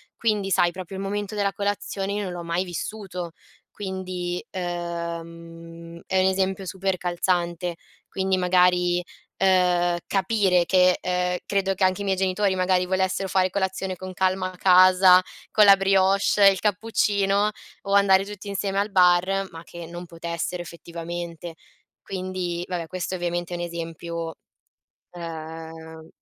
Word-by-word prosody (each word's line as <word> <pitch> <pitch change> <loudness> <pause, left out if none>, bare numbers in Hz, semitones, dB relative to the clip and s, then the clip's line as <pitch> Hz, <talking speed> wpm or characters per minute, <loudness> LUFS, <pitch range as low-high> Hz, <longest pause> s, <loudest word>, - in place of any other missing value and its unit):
quindi 210 -4 0
sai 175 -1 +3
proprio 185 +1 -8
il 190 - -4
momento 205 +1 -3
della 200 -1 +1
colazione 200 -1 -2
io 205 0 -2
non 185 - -4
l'ho 175 -1 -6
mai 170 +2 -1
vissuto; 180 -1 -5 0.4
quindi, 185 -3 -4
ehm, 170 -1 -6
è 190 - +1
un 185 - +3
esempio 190 0 0
super 190 +1 -2
calzante. 175 -1 -1 0.3
Quindi 190 0 0
magari, 180 -1 +3 0.3
ehm, 180 -2 +3
capire 195 -3 +2
che, 185 -1 +4
ehm, 180 0 0
credo 195 -1 +1
che 190 - -2
anche 185 +1 +2
i - - -2
miei 195 -1 +1
genitori 190 +1 +1
magari 185 0 +2
volessero 190 +1 0
fare 185 0 +2
colazione 190 0 -2
con 185 +1 -8
calma 185 0 0
a - - -15
casa 185 0 +7 0.3
con 215 - +6
la 200 -1 +9
brioche, 195 +1 +3
il 190 - -3
cappuccino 205 -1 +1 0.3
o 200 0 -3
andare 195 -1 +5
tutti 205 0 -9
insieme 200 0 -2
al 205 +1 -1
bar, 185 +1 +3
ma 165 0 -10
che 170 -1 -9
non 175 +1 -8
potessero 170 +1 -4
effettivamente. 170 0 -7 0.5
Quindi, 185 -2 -4
vabbè 175 -2 -3
questo 185 +2 -4
ovviamente 175 0 -3
è - - -4
un 175 - -4
esempio, 170 -1 -5 0.8
ehm 160 -1 -8
185 Hz, 145 wpm, -24 LUFS, 175-195 Hz, 0.8 s, la